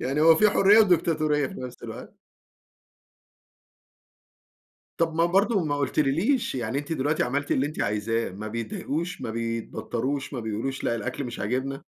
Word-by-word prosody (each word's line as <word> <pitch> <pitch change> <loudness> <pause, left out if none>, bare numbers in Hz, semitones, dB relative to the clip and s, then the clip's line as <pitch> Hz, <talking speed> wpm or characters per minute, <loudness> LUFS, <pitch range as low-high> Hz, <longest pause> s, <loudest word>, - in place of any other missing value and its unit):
يعني 135 +4 -1
هو 165 +1 +7
في 210 +3 +5
حُريّة 205 +2 +6
وديكتاتورية 160 -7 +3
في - - -9
نفس 125 -1 -8
الوقت. - - -8 2.8
طب 165 -1 +1
ما 165 +1 +3
برضه 195 +1 +2
ما 145 -1 -1
قُلتليليش 155 - +1
يعني 125 +2 -2
أنتِ 145 +3 -5
دلوقتي 150 +1 0
عملتِ 145 +4 -2
اللي 135 +2 +2
أنتِ 155 - -5
عايزاه 105 +2 -1
ما 105 +3 -7
بيتضايقوش، 140 +9 -4
ما 110 - -4
بيتبطّروش، 115 +4 -3
ما 125 - -3
بيقولوش 110 +5 -3
لأ 115 - +1
الأكل 125 +5 -4
مش 120 -1 -6
عاجبنا؟ 130 +5 -2
140 Hz, 150 wpm, -26 LUFS, 115-165 Hz, 2.8 s, هو